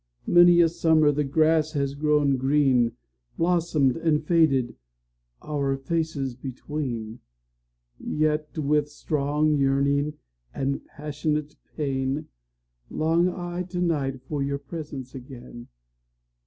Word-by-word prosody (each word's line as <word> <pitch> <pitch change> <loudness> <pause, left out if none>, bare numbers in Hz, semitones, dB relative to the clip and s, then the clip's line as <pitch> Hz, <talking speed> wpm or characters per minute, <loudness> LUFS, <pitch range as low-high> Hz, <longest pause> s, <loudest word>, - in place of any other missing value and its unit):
Many 175 0 +6
a 170 - +6
summer 160 -2 +3
the 150 +1 0
grass 155 +2 +2
has 140 -2 -1
grown 145 -1 +2
green, 130 -3 +2 0.4
Blossomed 165 -6 +2
and 155 -2 +1
faded, 145 -8 +2 0.7
our 140 -2 -1
faces 145 -2 -2
between:Yet, 120 - -5
with 150 0 +1
strong 150 0 0
yearning 140 +2 +1 0.4
and 140 +1 -2
passionate 150 0 -3 0.2
pain, 135 0 -2 0.6
Long 165 +3 +2
I 175 0 -4
to 180 0 -4
night 140 -7 -1
for 145 +1 -4
your 140 0 -1
presence 140 -2 -8
again. 125 -2 -10
145 Hz, 100 wpm, -25 LUFS, 135-155 Hz, 0.7 s, Many